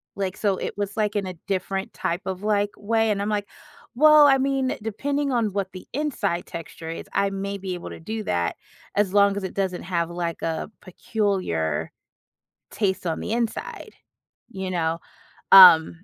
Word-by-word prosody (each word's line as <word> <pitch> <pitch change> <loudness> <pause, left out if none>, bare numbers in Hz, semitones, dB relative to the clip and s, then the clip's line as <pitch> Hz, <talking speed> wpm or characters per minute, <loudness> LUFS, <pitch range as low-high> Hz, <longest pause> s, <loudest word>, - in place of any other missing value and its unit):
Like, 190 -1 -3
so 200 -3 0
it - - -5
was 205 0 -3
like 210 -1 0
in 200 -2 0
a 185 - -5
different 195 0 -2
type 170 +2 -2
of, 190 0 -5
like, 205 -1 +1
way 225 +1 +1
and 200 - -1
I'm 205 - -2
like, 205 -1 -1 0.5
"Well, 305 +1 +7
I 270 -1 +5
mean, 270 -1 0
depending 280 +6 -2
on 225 -5 0
what 195 -2 -2
the 185 - -11
inside 235 - -2
texture 165 0 -8
is, 165 - -6
I 200 - +2
may 200 +1 -4
be 190 -1 -5
able 175 - -8
to - - -9
do 220 +6 -5
that 85 - -1 0.4
as 200 -2 +2
long 200 0 +4
as 200 - -4
it 190 - -5
doesn't 190 -2 -2
have 170 -2 -1
like 170 -1 -4
a 160 +3 -3
peculiar 185 - -2 0.8
taste 190 -4 -1
on 165 - -2
the - - -4
inside." 235 - -3 0.6
You 190 -1 -5
know? 165 -1 -1 0.5
Um, 175 -2 +8
195 Hz, 180 wpm, -24 LUFS, 180-215 Hz, 0.8 s, Um